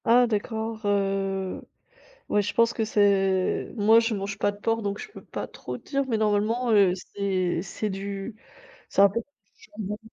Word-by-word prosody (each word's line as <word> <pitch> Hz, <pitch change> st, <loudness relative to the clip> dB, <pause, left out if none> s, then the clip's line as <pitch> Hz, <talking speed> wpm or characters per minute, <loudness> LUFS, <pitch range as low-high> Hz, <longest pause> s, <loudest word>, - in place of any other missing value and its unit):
Ah 245 Hz, +2 st, +6 dB
d'accord, 220 Hz, +1 st, -3 dB
heu, 195 Hz, -1 st, 0 dB, 0.7 s
ouais, 210 Hz, -, +3 dB
je 205 Hz, -, -3 dB
pense 230 Hz, 0 st, +3 dB
que 225 Hz, -, -1 dB
c'est 195 Hz, -3 st, +2 dB
moi 220 Hz, +1 st, +6 dB
je 230 Hz, 0 st, 0 dB
mange 200 Hz, 0 st, -4 dB
pas 205 Hz, -, +1 dB
de 205 Hz, -, -13 dB
porc 225 Hz, +2 st, -1 dB
donc 200 Hz, 0 st, -2 dB
je 435 Hz, -, -7 dB
peux -, -, -12 dB
pas -, -, -5 dB
trop -, -, -7 dB
dire 275 Hz, -1 st, -2 dB
mais 230 Hz, -4 st, 0 dB
normalement, 215 Hz, +3 st, +1 dB
heu, 200 Hz, -4 st, +5 dB
c'est 185 Hz, -2 st, -2 dB
c'est 210 Hz, +3 st, -4 dB
du 195 Hz, +2 st, -5 dB, 0.5 s
c'est -, -, +3 dB
un 200 Hz, -, +7 dB
peu 230 Hz, -, -1 dB
du 285 Hz, +5 st, -19 dB, 0.4 s
jambon. 210 Hz, -1 st, -4 dB
205 Hz, 185 wpm, -26 LUFS, 195-225 Hz, 0.7 s, un